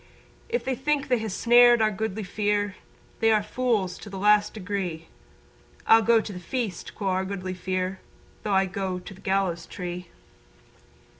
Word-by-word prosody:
If 475 Hz, +1 st, -1 dB
they 265 Hz, -, 0 dB
think 280 Hz, +2 st, -1 dB
they 250 Hz, -2 st, +3 dB
ha' 220 Hz, 0 st, -3 dB
snared 240 Hz, +3 st, +6 dB
our 215 Hz, -1 st, +3 dB
Goodly 215 Hz, 0 st, -3 dB
Fere 205 Hz, +1 st, -1 dB, 0.4 s
They 225 Hz, 0 st, +4 dB
are 215 Hz, -1 st, +3 dB
fools 210 Hz, -5 st, -1 dB
to 210 Hz, -, -10 dB
the 195 Hz, -, -7 dB
last 210 Hz, +1 st, +4 dB
degree. 185 Hz, -5 st, -4 dB, 0.8 s
"I'll 225 Hz, 0 st, +7 dB
go 230 Hz, +1 st, +4 dB
to 215 Hz, -1 st, -5 dB
the 180 Hz, -, -7 dB
feast," 215 Hz, -2 st, -4 dB
quo' 200 Hz, -2 st, -2 dB
our 185 Hz, 0 st, +1 dB
Goodly 190 Hz, -1 st, -4 dB
Fere, 185 Hz, +1 st, -3 dB, 0.4 s
"Though 205 Hz, -, -2 dB
I 190 Hz, 0 st, +4 dB
go 190 Hz, 0 st, -3 dB
to 180 Hz, +1 st, -9 dB
the 190 Hz, -, -16 dB
gallows 190 Hz, -3 st, 0 dB
tree." 180 Hz, -1 st, -6 dB
200 Hz, 170 wpm, -26 LUFS, 185-220 Hz, 0.8 s, I'll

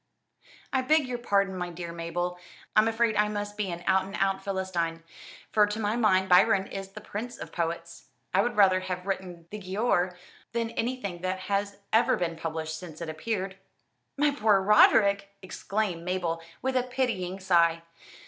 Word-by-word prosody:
"I 265 Hz, -, +3 dB
beg 300 Hz, +1 st, +3 dB
your 245 Hz, -1 st, -3 dB
pardon, 200 Hz, -4 st, +1 dB
my 180 Hz, -1 st, -3 dB
dear 170 Hz, 0 st, -6 dB
Mabel. 175 Hz, +1 st, -3 dB, 0.4 s
I'm 215 Hz, +1 st, +6 dB
afraid 225 Hz, -1 st, +1 dB
I 210 Hz, 0 st, +3 dB
must 205 Hz, 0 st, -4 dB
be 210 Hz, -2 st, -2 dB
an 170 Hz, 0 st, -5 dB
out 190 Hz, 0 st, +3 dB
and 195 Hz, +1 st, -7 dB
out 195 Hz, 0 st, 0 dB
Philistine, 180 Hz, -4 st, -2 dB, 0.5 s
for 210 Hz, -1 st, +5 dB
to 210 Hz, +1 st, -4 dB
my 210 Hz, 0 st, 0 dB
mind 190 Hz, -5 st, +3 dB
Byron 190 Hz, +2 st, +5 dB
is 195 Hz, 0 st, -7 dB
the 210 Hz, -, -8 dB
prince 225 Hz, +4 st, -6 dB
of -, -, -8 dB
poets. 170 Hz, 0 st, -4 dB, 0.3 s
I 195 Hz, -, +5 dB
would 240 Hz, +2 st, -1 dB
rather 190 Hz, -2 st, +6 dB
have 185 Hz, -1 st, -5 dB
written 185 Hz, -3 st, -4 dB
'The 210 Hz, -, -5 dB
Giaour' 185 Hz, -2 st, 0 dB, 0.4 s
than 230 Hz, -1 st, -1 dB
anything 225 Hz, -7 st, -3 dB
that 185 Hz, 0 st, -2 dB
has 200 Hz, +1 st, -1 dB, 0.2 s
ever 230 Hz, +2 st, +4 dB
been 170 Hz, -2 st, -2 dB
published 160 Hz, -1 st, -4 dB
since 165 Hz, -4 st, -10 dB
it 170 Hz, -2 st, -5 dB
appeared." 190 Hz, +3 st, -3 dB, 0.6 s
"My 295 Hz, +1 st, +3 dB
poor 215 Hz, -7 st, +3 dB
Roderick!" 200 Hz, 0 st, +5 dB
exclaimed 190 Hz, -2 st, -2 dB
Mabel, 175 Hz, -2 st, -2 dB, 0.2 s
with 265 Hz, 0 st, 0 dB
a 255 Hz, -, +4 dB
pitying 230 Hz, -8 st, -2 dB
sigh. 170 Hz, -3 st, +3 dB
195 Hz, 175 wpm, -28 LUFS, 180-215 Hz, 0.6 s, I'm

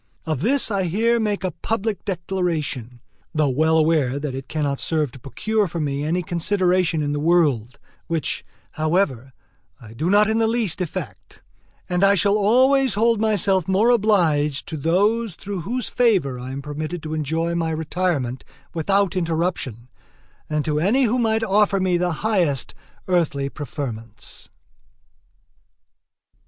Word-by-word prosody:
Of 155 Hz, -5 st, -2 dB
this 250 Hz, -, +2 dB
I 195 Hz, -2 st, 0 dB
here 225 Hz, +7 st, +1 dB
make 210 Hz, -3 st, -1 dB
a 185 Hz, -, -1 dB
public 215 Hz, +2 st, -3 dB
declaration, 165 Hz, -, -3 dB, 0.3 s
though 155 Hz, -2 st, +2 dB
well 160 Hz, +4 st, +2 dB
aware 155 Hz, -5 st, +2 dB
that 145 Hz, -2 st, -4 dB
it 135 Hz, 0 st, -6 dB
cannot 145 Hz, -3 st, -2 dB
serve 155 Hz, -5 st, 0 dB
to 130 Hz, -, -13 dB
procure 210 Hz, -, -1 dB
for 170 Hz, 0 st, -5 dB
me 145 Hz, -2 st, -2 dB
any 170 Hz, +4 st, 0 dB
consideration 180 Hz, -2 st, +1 dB
in 145 Hz, 0 st, -1 dB
the 145 Hz, -, -2 dB
world, 145 Hz, -7 st, +2 dB, 0.3 s
which, 165 Hz, -2 st, -2 dB, 0.3 s
however, 155 Hz, -, 0 dB, 0.5 s
I 115 Hz, -3 st, -13 dB
do 155 Hz, +9 st, -2 dB
not 205 Hz, +2 st, +5 dB
in 220 Hz, +1 st, +1 dB
the 225 Hz, -, +3 dB
least 220 Hz, -6 st, 0 dB
affect; 120 Hz, -, -6 dB, 0.4 s
and 180 Hz, +1 st, 0 dB
I 200 Hz, 0 st, +6 dB
shall 200 Hz, +2 st, +3 dB
always 255 Hz, +4 st, +3 dB
hold 225 Hz, 0 st, +2 dB
myself 195 Hz, -4 st, +2 dB
more 200 Hz, +6 st, +3 dB
obliged 170 Hz, -, +2 dB
to 160 Hz, -, -4 dB
those 200 Hz, +7 st, +1 dB
through 200 Hz, -2 st, -5 dB
whose 240 Hz, +8 st, -2 dB
favor 185 Hz, -, +1 dB
I 125 Hz, +1 st, -7 dB
am 140 Hz, +1 st, -6 dB
permitted 155 Hz, +3 st, -5 dB
to 155 Hz, 0 st, -5 dB
enjoy 160 Hz, +2 st, -1 dB
my 165 Hz, -1 st, -1 dB
retirement 160 Hz, -5 st, -2 dB, 0.3 s
without 195 Hz, +3 st, +1 dB
interruption 165 Hz, -, -2 dB, 0.6 s
than 150 Hz, -1 st, -1 dB
to 150 Hz, -1 st, 0 dB
any 215 Hz, -, +2 dB
who 245 Hz, +1 st, +1 dB
might 225 Hz, -1 st, +1 dB
offer 205 Hz, -1 st, +2 dB
me 185 Hz, -2 st, +1 dB
the 175 Hz, 0 st, 0 dB
highest 175 Hz, -, +1 dB, 0.3 s
earthly 155 Hz, -6 st, 0 dB
preferments. 120 Hz, -8 st, -7 dB
170 Hz, 150 wpm, -22 LUFS, 150-200 Hz, 0.6 s, I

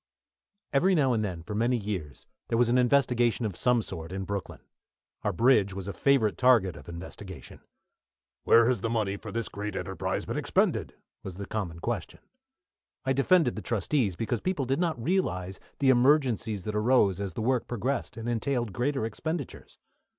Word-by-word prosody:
Every 180 Hz, +7 st, +4 dB
now 135 Hz, -5 st, +3 dB
and 110 Hz, -2 st, 0 dB
then, 90 Hz, -5 st, -4 dB
for 95 Hz, -, -6 dB
many 120 Hz, +4 st, +1 dB
years, 95 Hz, -, -5 dB, 0.2 s
there 115 Hz, -, 0 dB
was 120 Hz, 0 st, +3 dB
an 125 Hz, +1 st, +4 dB
investigation 125 Hz, -2 st, +2 dB
of 100 Hz, -5 st, -3 dB
some 120 Hz, +3 st, +2 dB
sort 80 Hz, -2 st, -7 dB
in 95 Hz, +1 st, -3 dB
Brooklyn. 100 Hz, 0 st, -5 dB, 0.6 s
Our -, -, 0 dB
bridge 110 Hz, -6 st, +3 dB
was 95 Hz, -1 st, -6 dB
a 100 Hz, -, -4 dB
favourite 110 Hz, -3 st, +2 dB
target 115 Hz, -9 st, +4 dB
of -, -, -12 dB
investigation. 90 Hz, -2 st, -9 dB, 0.8 s
"Where 115 Hz, 0 st, +6 dB
has 125 Hz, -5 st, +1 dB
the 115 Hz, -, -1 dB
money 110 Hz, -4 st, 0 dB
for -, -, -8 dB
this 115 Hz, -1 st, -2 dB
great 105 Hz, -1 st, -5 dB
enterprise -, -, -3 dB
been -, -, -3 dB
expended?" -, -, 0 dB, 0.3 s
was 95 Hz, -, -7 dB
the 100 Hz, +1 st, -6 dB
common 95 Hz, -6 st, -4 dB
question. -, -, -4 dB, 0.8 s
I 135 Hz, -, +2 dB
defended 145 Hz, 0 st, +3 dB
the 110 Hz, -, -5 dB
trustees, 110 Hz, -, 0 dB
because 115 Hz, +3 st, -2 dB
people 180 Hz, -7 st, -1 dB
did 135 Hz, +4 st, 0 dB
not 165 Hz, -7 st, 0 dB
realise 95 Hz, -, -1 dB, 0.2 s
the 135 Hz, -2 st, +4 dB
emergencies 125 Hz, -6 st, +2 dB
that 105 Hz, -, -4 dB
arose 105 Hz, -4 st, +3 dB
as 100 Hz, -3 st, -4 dB
the -, -, -4 dB
work 125 Hz, 0 st, +1 dB
progressed 125 Hz, +3 st, -3 dB
and 115 Hz, +1 st, -5 dB
entailed 120 Hz, -2 st, -1 dB
greater 130 Hz, +2 st, -1 dB
expenditures. 150 Hz, +6 st, -5 dB
115 Hz, 175 wpm, -28 LUFS, 100-130 Hz, 0.8 s, Where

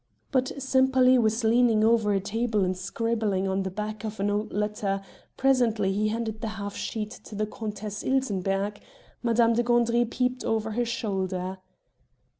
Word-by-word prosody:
But 260 Hz, -2 st, +1 dB
Sempaly 260 Hz, -1 st, +4 dB
was 225 Hz, +1 st, +1 dB
leaning 225 Hz, -1 st, +4 dB
over 225 Hz, -2 st, +3 dB
a 195 Hz, -, +2 dB
table 215 Hz, 0 st, 0 dB
and 185 Hz, 0 st, -1 dB
scribbling 205 Hz, 0 st, -1 dB
on 190 Hz, 0 st, 0 dB
the 190 Hz, -, -2 dB
back 210 Hz, +3 st, -5 dB
of 215 Hz, -1 st, -5 dB
an 205 Hz, +1 st, +1 dB
old 210 Hz, +1 st, -1 dB
letter; 210 Hz, -1 st, -1 dB, 0.4 s
presently 235 Hz, -7 st, +2 dB
he 210 Hz, +2 st, +1 dB
handed 220 Hz, 0 st, -3 dB
the 225 Hz, -, -2 dB
half 200 Hz, -1 st, -5 dB
sheet 215 Hz, -1 st, -4 dB
to 215 Hz, -, -9 dB
the 215 Hz, +1 st, 0 dB
Countess 210 Hz, -1 st, -5 dB
Ilsenbergh; 205 Hz, -6 st, 0 dB, 0.4 s
Madame 235 Hz, -1 st, +3 dB
de 235 Hz, -, +2 dB
Gandry 240 Hz, 0 st, +3 dB
peeped 250 Hz, +1 st, -1 dB
over 220 Hz, 0 st, -1 dB
her 240 Hz, +3 st, 0 dB
shoulder. 190 Hz, -4 st, -2 dB
215 Hz, 160 wpm, -27 LUFS, 205-235 Hz, 0.4 s, Sempaly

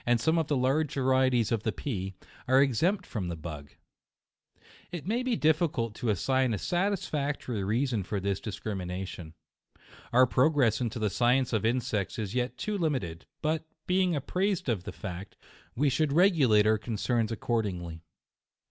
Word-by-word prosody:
13a 120 Hz, -1 st, +4 dB
some 160 Hz, +7 st, +2 dB
of 160 Hz, -, -1 dB
the 145 Hz, -, +1 dB
large 135 Hz, +4 st, +1 dB
varieties 130 Hz, -4 st, +2 dB
of 115 Hz, -3 st, +1 dB
the 110 Hz, -, -1 dB
pea, 95 Hz, -7 st, -4 dB, 0.3 s
are 130 Hz, +1 st, +5 dB
ex 135 Hz, -5 st, +2 dB
empt 185 Hz, +2 st, +2 dB
from 100 Hz, -7 st, -4 dB
the 85 Hz, -, -3 dB
bug. 75 Hz, -3 st, -8 dB, 1.2 s
It 175 Hz, -4 st, -6 dB
may 230 Hz, +6 st, 0 dB
be 255 Hz, -2 st, 0 dB
difficult 155 Hz, -, +1 dB
to 120 Hz, -, -2 dB
assign 130 Hz, +4 st, +1 dB
a -, -, -3 dB
satisfactory 150 Hz, -, -1 dB
reason 115 Hz, +2 st, 0 dB
for 100 Hz, +2 st, -3 dB
this 100 Hz, 0 st, -1 dB
discrimination. 95 Hz, -5 st, -5 dB, 0.8 s
Our 125 Hz, +2 st, +6 dB
progress 130 Hz, -1 st, +3 dB
in 120 Hz, -, 0 dB
the 110 Hz, -2 st, -2 dB
science 125 Hz, +2 st, +2 dB
of 110 Hz, 0 st, +2 dB
insects 115 Hz, -4 st, -1 dB
is 105 Hz, -4 st, -3 dB
yet 125 Hz, 0 st, -1 dB
too 210 Hz, -1 st, -2 dB
limited 125 Hz, -, -2 dB
*, -, -, -58 dB
but, 155 Hz, +1 st, 0 dB, 0.2 s
being 185 Hz, -2 st, +2 dB
apprised 180 Hz, +4 st, -1 dB
of 100 Hz, -6 st, -1 dB
the -, -, -5 dB
fact, 95 Hz, 0 st, -7 dB, 0.4 s
we 145 Hz, +4 st, +2 dB
should 140 Hz, +2 st, +1 dB
re 180 Hz, +6 st, +6 dB
gilate 115 Hz, -, +4 dB
our 110 Hz, 0 st, +3 dB
concerns 115 Hz, +1 st, -1 dB
accordingly. 95 Hz, -8 st, -2 dB
125 Hz, 165 wpm, -29 LUFS, 105-150 Hz, 1.2 s, Our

